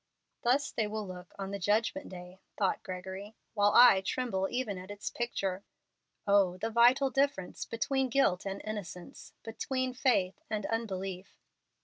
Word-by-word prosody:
"Thus 270 +4 +2
they 220 -2 -1
will 215 0 -4
look 180 -1 -9
on 195 -1 -5
the 200 - -4
Judgment 225 +9 0
Day," 180 0 -10 0.2
thought 195 -3 +1
Gregory, 190 +3 -7 0.2
"while 205 -1 +3
I 235 -5 +8
tremble 195 -2 -1
even 245 -7 -2
at 185 +1 -10
its 205 0 -5
picture. 195 -5 -2 0.6
O 200 -3 +3
the 225 +5 -3
vital 250 +4 +5
difference 270 -9 0
between 265 +3 -1
guilt 235 -8 +2
and 195 0 -5
innocence, 200 -5 -7
between 255 +3 -2
faith 210 -8 +1
and 215 -2 -2
unbelief!" 195 -4 -4
205 Hz, 145 wpm, -31 LUFS, 190-240 Hz, 0.6 s, I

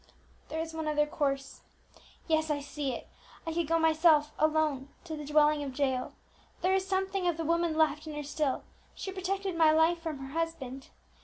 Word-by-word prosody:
"There 320 - -3
is 325 0 -4
one 320 -1 -3
other 295 -1 +2
course; 275 -2 -2 0.7
yes, 315 -1 +2
I 295 -1 +1
see 280 -1 -3
it. 240 - -6 0.4
I 325 - -2
could 335 -1 0
go 330 +1 +3
myself 315 -2 +4
alone 305 -3 +1
to 325 -3 -5
the 300 - -6
dwelling 300 0 +4
of 270 -2 -5
Jael; 260 -3 0 0.5
there 370 +1 +3
is 380 0 +1
something 385 -1 0
of 345 -2 +1
the 330 - -3
woman 335 0 +1
left 310 0 +2
in 305 - -5
her 295 - -4
still, 290 -1 -1 0.3
she 385 - -5
protected 385 0 -2
my 320 -2 +6
life 320 +2 +4
from 320 -3 -4
her 270 0 -8
husband. 320 -6 -3
315 Hz, 190 wpm, -30 LUFS, 295-330 Hz, 0.7 s, my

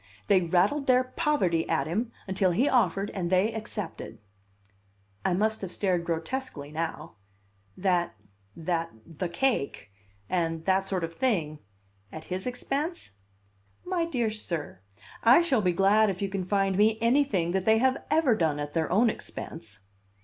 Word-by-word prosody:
They 195 -2 +4
rattled 185 - +1
their 255 0 +5
poverty 255 - 0
at 135 - +1
him 215 +10 -2 0.2
until 190 0 +1
he 250 +11 +2
offered 200 - +2
and 175 -3 -3
they 190 +5 +2
accepted." 205 - -5 1.1
I 185 - +1
must 220 +3 0
have 190 -3 -5
stared 180 -4 0
grotesquely 165 - -4
now. 160 -4 -5 0.6
"That 180 -2 +1 0.4
that 165 0 -2 0.2
the 170 +2 -5
cake 170 - -1 0.4
and 165 -2 -1
that 190 0 +2
sort 185 -3 -2
of 165 0 -4
thing 165 - -1 0.5
at 160 - -8
his 185 +5 -3
expense? 275 - -3 0.7
"My 355 -2 0
dear 240 -9 -1
sir, 170 - -5 0.4
I 245 +9 +6
shall 270 -10 +2
be 180 -2 +2
glad 200 +4 +4
if 185 -2 -3
you 200 - -2
can 190 -1 -3
find 195 0 +1
me 215 +1 +4
anything 230 -8 +2
that 190 0 -1
they 220 0 +5
have 260 +3 +1
ever 305 -6 +3
done 160 -6 +1
at 145 0 -5
their 165 -1 -1
own 220 +6 +4
expense!" 110 - -6
190 Hz, 155 wpm, -27 LUFS, 170-235 Hz, 1.1 s, I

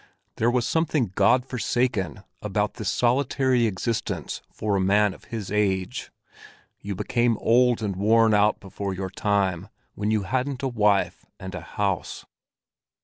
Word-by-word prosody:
There 115 - +2
was 120 -1 +1
something 155 - 0
God 105 +7 +3
forsaken 120 - -1 0.2
about - - -1
this - - -3
solitary 125 -1 +2
existence 110 +3 -3
for 105 -2 -1
a 95 - +1
man 100 +1 +3
of - - -16
his 110 -5 -6
age; 95 -3 -1 0.7
you 100 -1 -5
became 120 +4 +1
old 120 0 +3
and 100 -3 -2
worn 110 +3 +4
out 105 +1 +3
before 100 -1 -5
your 95 0 -4
time, 100 -2 0 0.2
when 105 0 -2
you 110 -2 +1
hadn't 130 +5 -2
a - - +1
wife 105 -5 +1
and 95 0 -7
a 90 - -5
house. 100 -3 -3
105 Hz, 145 wpm, -25 LUFS, 100-120 Hz, 0.7 s, worn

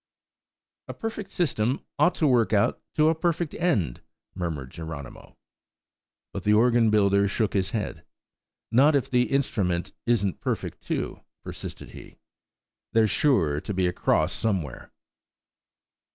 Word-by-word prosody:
"A - - -7
perfect 220 -3 -5
system 130 - -1
ought 170 +4 +4
to 160 - +1
work 120 -5 +3
out 105 +4 +2 0.2
a 155 +1 +5
perfect 170 -1 -1
end," 105 - 0 0.3
murmured 75 -7 -4
Geronimo. 80 -5 -9 1.0
But - - -4
the 105 - +3
organ 120 0 +4
builder 100 -1 +3
shook 105 +1 -1
his 95 -1 0
head. 105 -1 -4 0.7
"Not 145 +5 +5
if 140 - 0
the 125 -1 +2
instrument 100 -11 0
isn't 100 -6 +1
perfect - - -3
too," - - -3 0.2
persisted - - -8
he; - - -13 0.8
"there's 110 -2 +4
sure 85 - +2
to 105 - -4
be 95 -1 +1
a 90 - 0
cross 85 0 +1
somewhere." 95 - -3
110 Hz, 130 wpm, -26 LUFS, 90-140 Hz, 1.0 s, a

